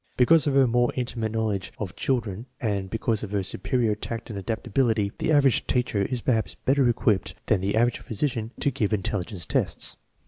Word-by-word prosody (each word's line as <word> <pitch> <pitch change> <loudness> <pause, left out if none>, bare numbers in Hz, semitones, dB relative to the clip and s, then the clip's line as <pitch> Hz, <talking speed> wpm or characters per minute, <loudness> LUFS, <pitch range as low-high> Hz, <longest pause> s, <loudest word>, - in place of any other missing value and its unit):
Because 150 +4 +5
of 140 - +1
her 135 -1 +6
more 120 0 +2
intimate 120 -3 -2
knowledge 110 -4 -1
of 100 -4 -5
children 115 -3 -2
and 100 -5 -1
because 110 +1 0
of 105 - -5
her 100 -2 +1
superior 110 +4 0
tact 115 +2 -5
and 100 - -4
adaptability, 110 0 0
the - - 0
average 140 -4 +4
teacher 120 -5 +1
is 120 +5 -1
perhaps 115 -3 0
better 135 -1 +2
equipped 105 -6 +1
than 105 -5 +2
the 100 +2 0
average 120 +1 +2
physician 115 -1 -2
to 140 - +2
give 110 -3 -1
intelligence 95 -2 -2
tests. - - -1
115 Hz, 180 wpm, -26 LUFS, 100-125 Hz, -, her